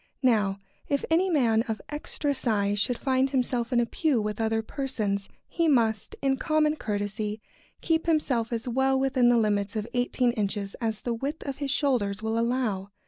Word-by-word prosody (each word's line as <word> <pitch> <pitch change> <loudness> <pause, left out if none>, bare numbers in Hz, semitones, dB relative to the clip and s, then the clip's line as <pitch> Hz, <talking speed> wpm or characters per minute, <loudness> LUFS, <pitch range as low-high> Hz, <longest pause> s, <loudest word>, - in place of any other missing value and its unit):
Now, 210 -6 +3 0.3
if 280 -1 0
any 360 +4 +3
man 235 -9 +3
of 220 -2 -2
extra 295 -1 -2
size 205 -5 0
should 245 +3 0
find 265 0 +1
himself 250 -2 -1
in 245 - +3
a 240 - +3
pew 285 +1 +1
with 210 +1 -2
other 225 0 +1
persons, 215 -7 -3 0.2
he 335 -1 0
must, 225 -7 +1
in 270 -1 +2
common 310 0 +2
courtesy, 210 0 -3 0.4
keep 325 -1 0
himself 260 -8 +1
as 230 +1 -3
well 265 +2 +2
within 260 -2 +3
the 240 - +5
limits 205 -2 +1
of 215 0 -2
eighteen 245 0 +1
inches 205 -2 -2
as 220 -2 -2
the 240 - -2
width 275 +7 -4
of 275 -2 -4
his 285 -1 -3
shoulders 225 -8 0
will 220 +1 0
allow. 230 -5 -1
240 Hz, 180 wpm, -27 LUFS, 215-270 Hz, 0.4 s, the